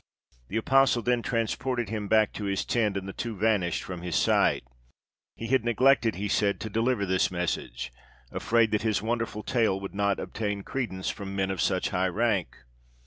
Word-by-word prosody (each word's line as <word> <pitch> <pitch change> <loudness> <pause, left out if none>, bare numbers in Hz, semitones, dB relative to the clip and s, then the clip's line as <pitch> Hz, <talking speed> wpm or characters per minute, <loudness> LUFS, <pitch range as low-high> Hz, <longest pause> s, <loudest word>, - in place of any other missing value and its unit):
The 110 - -3
apostle 130 0 +3
then 125 -1 +2
transported 120 0 -1
him 105 -2 -3
back 110 0 +3
to 105 - -5
his 100 -1 -1
tent, 105 -4 +1
and 95 0 -5
the 95 - -6
two 115 -2 -4
vanished 100 -5 +1
from 90 -2 -6
his 90 -2 -3
sight. - - +3 0.7
He 115 - -6
had 130 -3 +3
neglected, 120 0 +3
he 100 +3 -3
said, 100 0 +1
to 110 - -5
deliver 115 -1 +1
this 95 -1 +2
message, 75 -9 -3 0.4
afraid 115 -1 +2
that 105 - +1
his 105 -2 0
wonderful 115 -2 -2
tale 110 -6 +1
would 95 0 -7
not 100 0 +1
obtain 105 -2 -3
credence 115 -9 -3
from 100 -1 -7
men 95 -1 0
of 95 - -2
such 95 -2 +1
high 95 +1 +1
rank. 100 - -1
105 Hz, 185 wpm, -27 LUFS, 95-115 Hz, 0.7 s, apostle